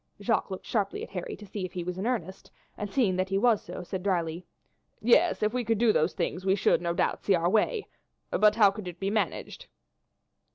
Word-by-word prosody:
Jacques 220 +1 0
looked 190 - -6
sharply 205 -4 -1
at - - -9
Harry 180 -3 -5
to 210 - -12
see 200 0 -6
if 185 - -5
he 180 - -3
was 180 +1 -4
in 205 - -2
earnest, 190 -7 -3 0.3
and 210 - -5
seeing 215 -8 +2
that 185 0 0
he 195 - +1
was 225 0 +3
so, - - -8
said 185 +1 -5
drily: 175 -3 -1 0.6
"Yes, 270 +6 +3
if 215 +2 +1
we 250 -1 0
could 225 -1 +1
do 225 0 +4
those 155 +3 +2
things 180 0 -2
we 190 0 +3
should, 195 - +2
no 170 -1 -1
doubt, 170 - -1
see 195 - +3
our 170 0 +1
way; 410 - +1 0.4
but 210 0 +4
how 205 -3 +6
could 200 -2 -8
it 175 -1 -8
be 195 +1 -1
managed?" 225 - -2
195 Hz, 230 wpm, -28 LUFS, 180-220 Hz, 0.6 s, how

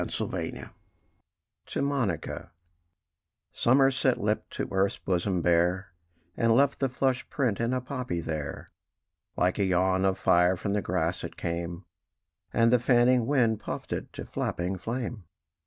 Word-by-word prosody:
THE - - -5
POPPY - - -4 1.0
To - - -2
MONICA 130 - -2 1.0
Summer 135 +2 +4
set 130 - +1
lip - - -1
to - - -4
earth's 95 +1 +1
bosom 90 -1 -1
bare, 90 +3 +2 0.4
And 115 -1 +3
left 140 +2 +3
the 135 - +1
flushed 130 0 -1
print 125 -8 0
in 115 +1 0
a 130 0 0
poppy 125 -8 -3
there: 80 -3 -5 0.7
Like 90 +3 +1
a - - +3
yawn 95 0 +2
of 95 -1 +2
fire 90 0 +3
from 100 +3 -2
the 105 - +1
grass 90 -1 -1
it 85 - -7
came, 85 +1 -4 0.7
And 115 +1 +3
the 125 - +5
fanning 120 0 +4
wind 120 -6 +2
puffed - - -5
it - - -5
to - - -7
flapping 90 +2 -3
flame. 115 -2 -4
100 Hz, 150 wpm, -28 LUFS, 90-125 Hz, 1.0 s, the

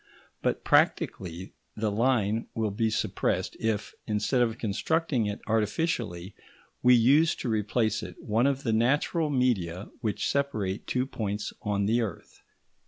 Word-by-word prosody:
But, - - -1
practically, 90 0 +1 0.2
the 110 -1 -1
line 115 -1 +1
will 110 -2 0
be 110 +3 0
suppressed 110 - -1
if, 110 -2 -1
instead 110 +4 +1
of 115 -1 +1
constructing 120 +3 0
it 105 - -4
artificially, 105 - -1 0.5
we 125 0 +7
use 140 +8 +4
to - - -5
replace 110 +1 0
it - - -8
one 115 +5 +1
of 140 0 -1
the 115 - 0
natural 145 +7 +2
media 105 - 0
which 110 -4 -1
separate 110 -9 -1
two 125 0 0
points 105 -5 -4
on 100 -1 0
the 115 +4 +2
earth. 105 -7 -6
110 Hz, 140 wpm, -28 LUFS, 105-125 Hz, 0.5 s, we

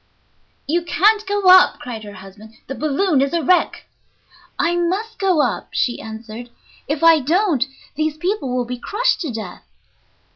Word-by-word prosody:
"You 335 +5 0
can't 400 +7 +2
go 405 -1 0
up," 370 0 +6
cried 235 -3 -8
her 205 - -10
husband; 200 +3 -14
"the 270 - -6
balloon 305 +2 0
is 275 +2 -1
a 335 - 0
wreck." 360 +6 +1 0.7
"I 345 - +1
must 380 +6 -2
go 370 -6 +2
up," 250 - -2
she 240 - -1
answered; 220 +2 -9 0.4
"if 295 +2 -3
I 330 -1 +7
don't 310 - +1 0.3
these 310 0 -2
people 355 -4 -2
will 250 -1 -1
be 250 0 -6
crushed 425 - 0
to 315 -7 -3
death." 215 -6 -7
300 Hz, 160 wpm, -19 LUFS, 245-365 Hz, 0.7 s, I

